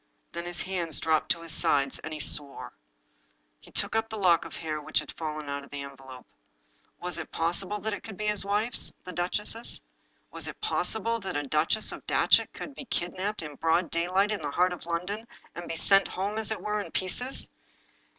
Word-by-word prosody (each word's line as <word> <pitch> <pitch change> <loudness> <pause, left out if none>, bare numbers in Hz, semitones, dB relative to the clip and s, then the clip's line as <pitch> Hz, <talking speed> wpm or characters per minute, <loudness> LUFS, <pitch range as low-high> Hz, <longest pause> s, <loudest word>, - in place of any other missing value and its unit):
Then 170 0 -4
his 175 0 -3
hands 175 -5 0
dropped 160 -1 +2
to 170 - +1
his 165 - -5
sides, 140 -2 +2
and 155 - -6
he 155 - -4
swore. 140 - +1 0.9
He - - -16
took - - +2
up 225 0 +1
the 220 - -4
lock 180 -4 +4
of - - -7
hair 155 -2 -3
which - - -1
had - - 0
fallen 155 -2 -4
out 140 0 -3
of 140 - -13
the 145 -1 -5
envelope. 135 -2 -10 0.7
Was 180 -1 -2
it 160 - -5
possible 180 +5 0
that 220 0 -1
it - - -4
could 220 -4 -8
be 215 - -2
his 210 -2 +6
wife's, 210 +4 +1
the 185 - -6
duchess? 195 +6 -1 0.5
Was - - -1
it - - -7
possible 230 +2 +1
that 190 -7 -3
a 145 - 0
Duchess 155 +9 +2
of - - -9
Datchet - - +4
could 290 - -7
be 275 - -8
kidnaped, 190 0 -2
in 150 -2 -6
broad 165 +2 +2
daylight, 185 +5 +2
in 210 - -1
the 150 - -2
heart 180 +5 +3
of 170 - -8
London, 190 +7 -2 0.3
and 175 - -7
be - - -1
sent 195 +4 +5
home, 200 +4 -2
as 220 - +1
it 220 - -2
were, 210 0 0
in 205 - -4
pieces? 245 +8 +1
180 Hz, 210 wpm, -29 LUFS, 155-210 Hz, 0.9 s, his